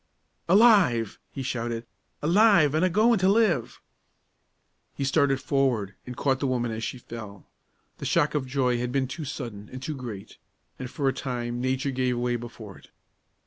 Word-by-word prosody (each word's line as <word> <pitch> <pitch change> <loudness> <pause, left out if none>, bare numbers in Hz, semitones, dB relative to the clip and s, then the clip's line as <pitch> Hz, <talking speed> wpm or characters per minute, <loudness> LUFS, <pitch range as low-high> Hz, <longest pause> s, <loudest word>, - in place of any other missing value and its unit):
"Alive!" 185 - +5
he 135 - -5
shouted. 115 -2 -3 0.4
"Alive, 175 -3 +5
an' 155 - +2
a 185 - +4
goin' 215 +4 +3
to 185 +1 +3
live!" 200 - +2 1.2
He - - -3
started 135 0 +2
forward, 130 -9 0
and 125 - -7
caught 135 -2 +1
the 140 - 0
woman 120 -2 -1
as 110 +1 -4
she 130 - -4
fell. 110 -5 -10 0.5
The - - -6
shock - - +2
of 140 -3 -1
joy 125 -2 +1
had 125 0 -2
been 135 0 0
too 150 +4 -6
sudden 115 -7 -7
and 130 - -7
too 150 +3 -4
great, 115 - -8 0.4
and 130 -2 -5
for 140 +1 -2
a 135 - +2
time 120 -2 -4
nature 130 +2 -1
gave 125 -1 0
way 120 0 0
before 115 -4 -9
it. - - -20
130 Hz, 175 wpm, -26 LUFS, 120-145 Hz, 1.2 s, Alive